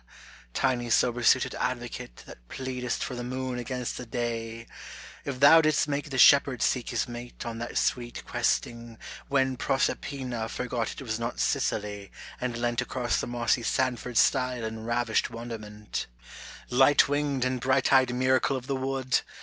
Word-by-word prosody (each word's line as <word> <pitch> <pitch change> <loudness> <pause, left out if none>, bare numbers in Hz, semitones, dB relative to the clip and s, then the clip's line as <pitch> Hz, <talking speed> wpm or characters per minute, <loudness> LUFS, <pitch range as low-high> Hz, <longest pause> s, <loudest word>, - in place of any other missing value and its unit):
tiny 120 -2 0
sober 120 +2 +2
suited 130 +2 +4
advocate 120 - -4
That - - -14
pleadest 125 -2 -3
for - - -4
the 120 0 -5
moon 130 0 -3
against 125 0 -4
the 125 - -6
day 115 -1 -4 0.6
1 140 - -3
If - - -12
thou 150 +4 +8
didst 155 -1 +2
make 145 +1 -2
the 135 - -4
shepherd 135 -1 +6
seek 125 -2 0
his - - -1
mate 120 0 -8
On 115 -1 -5
that 120 - -4
sweet 120 -1 -1
questing, 115 -1 -1 0.3
when 130 -2 +1
Proserpina 130 -3 -1
Forgot 125 -2 -3
it - - -9
was 110 -3 -3
not 115 +1 -4
Sicily 105 -1 -1 0.3
and 125 -2 -2
leant 120 0 0
Across 125 -2 -1
the - - -4
mossy 120 0 +1
Sandford 125 0 -1
stile 125 -2 +2
in 110 0 -6
ravished 120 -1 0
wonder 115 -1 -6
ment, 105 0 -6 0.3
— - - -12 0.3
light 135 +3 +5
winged 145 -2 0
and 130 -1 -1
bright 130 +1 +2
eyed 130 -2 +5
miracle 130 +1 +2
of 125 - -8
the 135 - -1
wood 130 -2 0
125 Hz, 165 wpm, -27 LUFS, 115-130 Hz, 0.6 s, thou